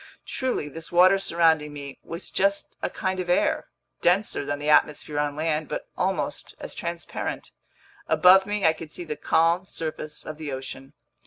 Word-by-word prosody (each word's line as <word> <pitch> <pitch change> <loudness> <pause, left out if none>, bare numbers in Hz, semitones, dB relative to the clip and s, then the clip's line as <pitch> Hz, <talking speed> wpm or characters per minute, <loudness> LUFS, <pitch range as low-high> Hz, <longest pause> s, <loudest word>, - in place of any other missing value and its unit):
Truly, 255 - -2
this 160 +2 -8
water 185 +3 +6
surrounding 160 -5 +2
me 140 -2 -8
was 165 +2 -6
just 200 +1 0
a - - -1
kind 190 -1 -2
of 180 -1 -3
air, 180 - +2 0.3
denser 180 -3 +2
than 145 0 -2
the 145 +1 -5
atmosphere 150 0 +2
on 145 -1 0
land 155 0 -1
but - - -5
almost - - -2
as - - -7
transparent. 170 0 -5 0.6
Above 180 +5 +6
me 205 -2 -1
I 160 - +6
could 160 -1 -9
see 175 - -6
the 150 - -4
calm 165 +5 +2
surface 155 -3 -4
of 155 0 -7
the 155 -2 -4
ocean. 135 0 -7
160 Hz, 170 wpm, -25 LUFS, 150-180 Hz, 0.6 s, water